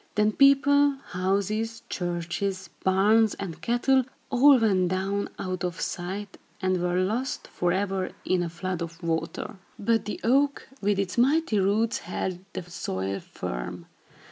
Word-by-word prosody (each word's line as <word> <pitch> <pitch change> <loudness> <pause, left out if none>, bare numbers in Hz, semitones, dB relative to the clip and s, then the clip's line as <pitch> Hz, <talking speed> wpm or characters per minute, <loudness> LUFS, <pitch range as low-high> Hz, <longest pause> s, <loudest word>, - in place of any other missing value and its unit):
Then 210 0 +3
people, 280 +2 +5
houses, 200 +5 -1
churches, 175 +1 -3
barns 210 +4 +4
and 180 -5 -6
cattle 255 +2 +2 0.3
all 275 +2 +7
went 195 -6 +3
down, 195 +2 -1
out 185 -1 -3
of 175 -1 -3
sight, 190 +3 -4 0.2
and 185 -2 0
were 180 0 +1
lost 225 +8 -1
forever, 190 +1 -1 0.2
in 185 -1 +2
a 175 - -2
flood 180 +1 -4
of 170 +1 -6
water. 165 +4 -2 0.2
But 225 +2 +1
the 210 - -4
oak, 275 +4 +2
with 205 0 +2
its 195 +3 -1
mighty 275 -3 +3
roots, 210 +4 +2
held 180 0 -3
the - - -4
soil 100 - -3
firm. 85 +9 -6
195 Hz, 140 wpm, -27 LUFS, 180-225 Hz, 0.3 s, all